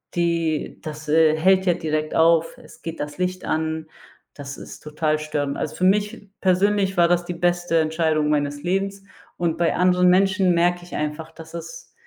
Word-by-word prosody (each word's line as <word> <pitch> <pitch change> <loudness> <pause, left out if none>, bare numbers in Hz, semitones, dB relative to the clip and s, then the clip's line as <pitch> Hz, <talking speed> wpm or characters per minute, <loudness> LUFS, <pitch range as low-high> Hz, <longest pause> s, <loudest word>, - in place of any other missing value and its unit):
die 170 -3 -1
das, 155 0 -8
äh, 155 0 +4
hält 190 +3 +3
ja 180 - +4
direkt 155 -1 -2
auf, 165 0 +3
es - - -16
geht 165 0 -6
das 145 0 -5
Licht 185 0 -2
an, 160 0 -2 0.5
das 140 -1 -8
ist - - -10
total 155 0 -1
störend. 145 -2 -2
Also, - - -4
für - - -3
mich 205 +2 0
persönlich 195 +1 +2
war 170 -1 +5
das 175 0 +2
die 175 - -4
beste 175 0 0
Entscheidung 155 -1 +1
meines 145 -1 -1
Lebens 195 +2 -2 0.3
und 170 -2 -1
bei 170 -1 +1
anderen 180 0 +4
Menschen 190 0 +3
merke 175 +1 +1
ich 175 - -13
einfach, 150 +1 -4
dass 160 0 -13
es - - -9
170 Hz, 180 wpm, -22 LUFS, 155-180 Hz, 0.5 s, war